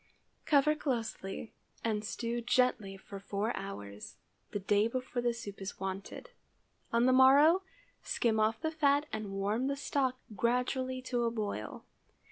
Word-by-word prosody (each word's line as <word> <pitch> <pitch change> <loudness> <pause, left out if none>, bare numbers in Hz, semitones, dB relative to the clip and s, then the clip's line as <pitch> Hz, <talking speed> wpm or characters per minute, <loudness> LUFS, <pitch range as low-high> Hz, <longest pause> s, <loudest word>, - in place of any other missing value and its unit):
Cover 300 0 +5
closely 230 -8 -3 0.3
and 215 -2 0
stew 235 +3 -3
gently 245 -5 +1
for 195 +1 -9
four 205 +3 -2
hours, 105 - -7 0.3
the - - -3
day 205 +2 +2
before 255 0 -3
the 240 0 +2
soup 220 -4 -8
is 195 - -6
wanted. 195 - -5 0.6
On 235 +1 +3
the 255 - +5
morrow, 285 +7 +7 0.4
skim 225 -2 +1
off 220 +1 +2
the 315 -1 -1
fat 290 -2 +3
and 215 -2 -3
warm 205 +6 0
the 280 - 0
stock 270 -2 0 0.2
gradually 255 +3 0
to 245 -2 -1
a - - +2
boil. 210 - -4
235 Hz, 145 wpm, -32 LUFS, 205-260 Hz, 0.6 s, morrow